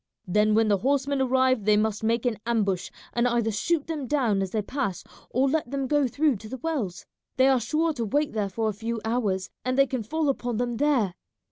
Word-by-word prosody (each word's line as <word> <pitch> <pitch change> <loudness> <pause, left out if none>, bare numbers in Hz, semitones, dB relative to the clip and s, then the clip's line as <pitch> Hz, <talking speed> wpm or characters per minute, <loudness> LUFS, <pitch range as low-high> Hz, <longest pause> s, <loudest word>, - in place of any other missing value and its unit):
Then 210 +3 +2
when 225 0 +4
the 205 -2 +2
horsemen 275 +2 +1
arrive 260 -2 +2
they 210 0 +5
must 215 0 0
make 230 +2 +1
an 230 -5 0
ambush, 200 -6 0 0.2
and 240 +1 +2
either 235 -2 +1
shoot 295 +9 0
them 305 -5 -4
down 240 -9 +1
as 190 - -2
they 215 +2 -1
pass 250 -5 -3 0.3
or 260 +3 +2
let 300 -2 0
them 275 0 -2
go 290 0 +2
through 285 +1 +1
to 215 +2 -11
the 260 - -5
wells. 255 - -3 0.3
They 260 0 +5
are 265 -2 +4
sure 310 +8 0
to 235 -5 -3
wait 290 +7 0
there 210 -3 -1
for 220 +3 -1
a 215 - 0
few 225 +3 -4
hours, 210 -5 -1
and 255 +1 -1
they 275 - +6
can 260 -2 -3
fall 310 +8 -1
upon 245 -4 -1
them 240 -1 -1
there. 255 -9 +2
240 Hz, 225 wpm, -26 LUFS, 215-275 Hz, 0.3 s, they